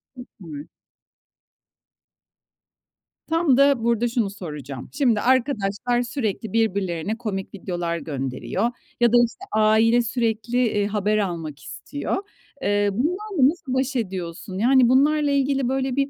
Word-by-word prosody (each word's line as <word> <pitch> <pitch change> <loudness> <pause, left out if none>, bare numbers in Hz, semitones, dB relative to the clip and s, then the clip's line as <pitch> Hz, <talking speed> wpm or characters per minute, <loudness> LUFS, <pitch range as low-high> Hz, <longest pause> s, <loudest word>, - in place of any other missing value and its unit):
Süper. 170 - -10 2.6
Tam 325 -5 +3
da 275 -4 +4
burada 235 0 +2
şunu 230 -4 0
soracağım: 150 - -8
Şimdi, 240 -8 +2
arkadaşlar 245 -2 +1
sürekli 230 -4 -3
birbirlerine 200 -3 0
komik 205 -5 -4
videolar 175 -3 -3
gönderiyor 140 - -2 0.3
ya 240 -1 +4
da, 240 - +7
işte, 365 +11 -10
aile 220 +2 +4
sürekli, 230 -1 -1
eee, 205 -1 0
haber 210 0 0
almak 165 -7 -3
istiyor. 280 - -4 0.4
Eee, 205 0 +2
bunlarla 335 - +1
nasıl 290 -6 -5
baş 265 +1 0
ediyorsun? 185 -4 -4
Yani 250 +3 +4
bunlarla 290 +3 +3
ilgili, 275 -2 +1
böyle, 265 -1 -1
bir 275 0 +1
230 Hz, 120 wpm, -23 LUFS, 195-260 Hz, 2.6 s, da